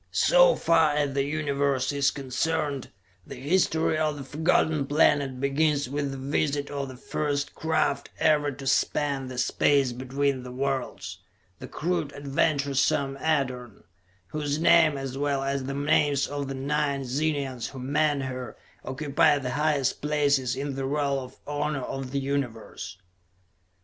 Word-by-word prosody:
So - - +5
far 160 -3 +3
as 145 -2 0
the 140 0 +1
Universe 140 -3 0
is 140 0 +2
concerned, 140 +1 -2 0.4
the - - -8
history 160 +2 +1
of 155 -1 0
the 140 - -6
Forgotten 155 0 +1
Planet 140 -3 +2
begins 145 +1 +1
with 140 +1 -2
the 135 - -5
visit 140 +1 -1
of 140 -1 -3
the 130 -1 -10
first 145 +2 -2
craft 160 -3 0
ever 150 -2 +3
to 135 0 -9
span 135 0 +1
the 130 -1 -7
space 135 +1 +2
between 130 +2 -1
the 125 0 -8
worlds: 135 0 -3 0.4
the - - -8
crude, 165 -3 -2
adventuresome 140 -1 +1
Edorn, 130 -7 -2 0.5
whose 145 -1 -2
name, 160 -3 +5
as 135 0 -5
well 140 -1 0
as 135 -1 -2
the 135 +1 -4
names 145 -1 +2
of 145 -1 -4
the 135 - -4
nine 140 0 -1
Zenians 135 -2 -1
who 135 - -10
manned 145 +2 +1
her, 130 -1 -6 0.3
occupy 145 +2 +2
the 130 -3 -3
highest 145 -1 0
places 145 -4 +1
in 140 +1 -3
the 135 0 -3
roll 140 0 0
of 130 0 -10
honor 145 -1 -2
of 135 0 -5
the 140 +2 -1
Universe. 120 -9 -4
140 Hz, 150 wpm, -26 LUFS, 135-150 Hz, 0.5 s, So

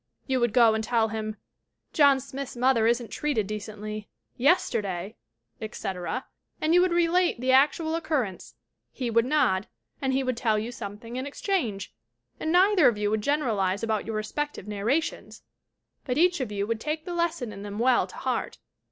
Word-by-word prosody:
You 260 -2 0
would 240 -2 +2
go 230 -1 +5
and 220 0 -1
tell 225 -1 +1
him: 215 0 -4 0.6
"John 280 -3 +5
Smith's 275 -1 -7
mother 240 -3 +3
isn't 235 -2 0
treated 285 -9 -1
de 210 +2 -4
cently. 215 0 -7 0.3
Yesterday," 210 - +1 0.5
etc., 210 +2 -4 0.3
and 315 +2 +1
you 355 - +6
would 365 0 +2
relate 345 -3 +2
the 255 +1 +1
actual 300 +4 +3
occurrence. 295 - -2 0.4
He 245 -4 -3
would 230 +1 +3
nod. 235 -9 +2 0.3
And 265 -1 0
he 265 +1 +1
would 255 -2 -1
tell 220 -3 +1
you 220 +3 -3
something 230 +1 -7
in 260 +2 -3
exchange. 265 - -2 0.5
And 315 - -1
neither 365 -3 +5
of 235 -4 +2
you 210 0 0
would 215 0 0
generalize 210 -9 0
about 220 -1 -1
your 225 - -3
respective 215 +2 -3
narrations, 220 +10 -2 0.6
but 250 -1 -2
each 350 +1 +3
of 250 -5 -3
you 200 -1 -1
would 225 +1 -2
take 310 +5 -3
the 355 - -4
lesson 340 -10 -1
in 200 - -9
them 205 0 -6
well 245 +2 +3
to - - -13
heart. - - -2
240 Hz, 180 wpm, -27 LUFS, 215-295 Hz, 0.6 s, you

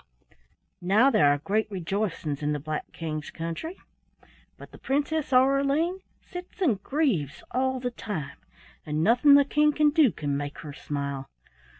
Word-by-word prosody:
"Now 210 +9 +4
there 145 - +5
are 145 - +2
great 205 +9 -1
rejoicings 185 -6 -3
in 150 0 0
the 150 - -2
Black 155 +1 -5
King's 155 -2 -5
country, 170 - -6 0.8
but - - -13
the - - -14
Princess 290 +2 -1
Aureline 275 +7 +3 0.2
sits 360 0 -10
and 250 - +1
grieves 220 - -1
all 260 0 0
the 245 0 -3
time, 155 -12 -6 0.5
and 150 +1 -1
nothing 245 - +6
the 285 0 +6
King 300 +1 +3
can 300 0 +3
do 295 -6 +4
can 145 -4 -3
make 145 +1 -4
her 150 -3 -8
smile. 140 -2 -5
210 Hz, 155 wpm, -26 LUFS, -, 0.8 s, nothing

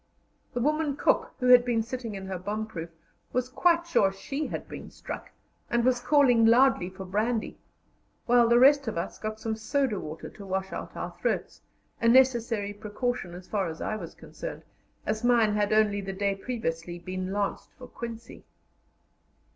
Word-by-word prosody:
The - - 0
woman 300 +1 +1
cook, - - +1
who 250 - -2
had 250 -1 +9
been 235 -2 +1
sitting 235 -2 -5
in 190 0 -6
her 190 -1 -4
bomb 210 +4 -3
proof, 170 -6 -7 0.4
was 250 0 0
quite 340 +5 +3
sure 265 -13 +3
she 275 +10 -4
had - - -5
been - - -8
struck, - - -8 0.4
and 235 0 +1
was 255 -1 +3
calling 250 -3 +4
loudly 230 -5 +5
for 190 0 -9
brandy; 215 +4 -1 0.7
while 240 -1 +5
the 235 - +6
rest 275 +1 +6
of 220 - -2
us 170 - -4
got 215 0 -4
some 220 0 -2
soda 225 -1 0
water 155 -1 -7
to 205 - -12
wash 190 0 -3
out - - -6
our - - -5
throats - - -2 0.4
a 230 - +3
necessary 235 -4 +3
precaution 210 -2 -3
as 180 +1 -11
far 200 -4 -1
as 160 -1 -6
I 215 - -2
was 170 -6 -8
concerned, - - -8 0.4
as 215 +2 -2
mine 235 -3 +4
had 205 -1 +1
only 215 -2 +3
the 195 0 -5
day 200 +1 0
previously 175 -6 -4
been 185 +2 -5
lanced 200 0 -2
for 255 - -10
quinsy. 230 -1 -8
220 Hz, 180 wpm, -28 LUFS, 195-245 Hz, 0.7 s, had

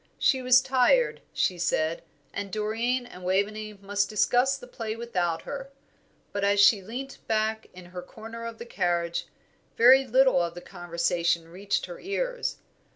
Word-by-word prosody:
She 260 -2 +2
was 255 0 +6
tired, 270 - +3
she 180 -2 0
said, 165 -1 0 0.3
and 200 -1 -5
Doreen 225 +5 -1
and 185 -7 -12
Waveney 210 +3 -1
must 200 0 -1
discuss 250 +5 +2
the 260 - -11
play 225 -3 -5
without 180 -8 -2
her; 275 -1 -6 0.6
but 200 - -3
as 200 0 +3
she 205 0 +6
leant 250 +7 -7
back 220 0 0
in 180 -1 -12
her 180 0 -8
corner 225 +5 -10
of 230 -1 -8
the 235 - -8
carriage, 175 -6 -1 0.5
very 260 +3 +7
little 260 -5 +4
of 170 0 -3
the 175 - -8
conversation 170 -2 -1
reached 195 +4 -2
her 175 -1 -9
ears. - - -2
215 Hz, 160 wpm, -27 LUFS, 180-250 Hz, 0.6 s, very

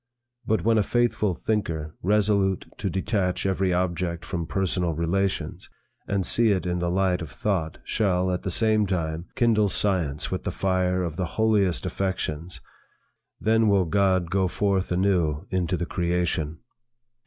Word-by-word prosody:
But 110 - +1
when 115 0 +3
a - - +4
faithful 110 -4 +1
thinker, 80 -7 -2
resolute 100 -1 +2
to - - -1
detach 95 -2 -1
every 95 -1 +1
object 85 -1 -1
from 85 -3 -3
personal 90 -3 0
relations, 90 +5 -2 0.4
and 100 -2 0
see 115 +5 +4
it 95 -3 +1
in 90 0 -1
the 85 0 -1
light 90 0 +1
of 80 - -6
thought, 85 -4 -2
shall, 95 -4 +1
at 90 - -2
the 95 - -3
same 110 +2 +2
time, 85 -2 -2
kindle 110 -3 +3
science 90 -7 0
with - - -3
the - - -2
fire 95 -1 0
of 85 -2 -4
the 90 - 0
holiest 105 -5 +2
affections, 90 -3 -3 0.8
then 110 +1 +3
will 100 -3 +3
God 95 -1 +1
go 95 -1 +2
forth 95 0 0
anew 90 -5 +1
into 90 -1 0
the 90 - -2
creation. 85 -3 -1
95 Hz, 155 wpm, -25 LUFS, 85-100 Hz, 0.8 s, a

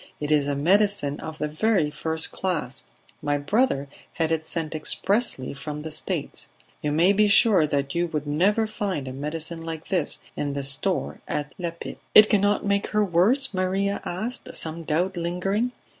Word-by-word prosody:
It 150 0 -3
is 145 -2 +3
a 145 - 0
medicine 180 -1 +3
of 160 0 -7
the 150 - -1
very 160 0 +1
first 160 +1 -2
class; 155 -9 -2 0.4
my 145 0 0
brother 145 - +1 0.3
had 165 -1 0
it 160 -1 -1
sent 165 -2 -3
expressly 160 - +1
from 150 +1 -6
the 160 - -5
States. 155 - -2 0.3
You 150 - -1
may 170 +6 +4
be 210 +1 +4
sure 200 -6 +5
that 140 -2 -1
you 175 +1 +1
would 155 -3 -3
never 190 +10 +2
find 195 -10 -3
a 130 - -5
medicine 155 +4 -4
like 165 -1 -6
this 175 -6 +1 0.2
in 145 -1 -2
the 140 0 -3
store 140 +8 -2
at 150 0 -3
La 175 -1 -1
Pipe." 170 0 -9 0.2
"It 215 0 +9
cannot 205 0 +2
make 200 0 +1
her 210 0 +1
worse?" 210 +10 +2
Maria 195 +2 0
asked, 240 +7 -4
some 160 +1 0
doubt 175 +5 0
lingering. 195 +7 -1
165 Hz, 175 wpm, -25 LUFS, 150-200 Hz, 0.4 s, It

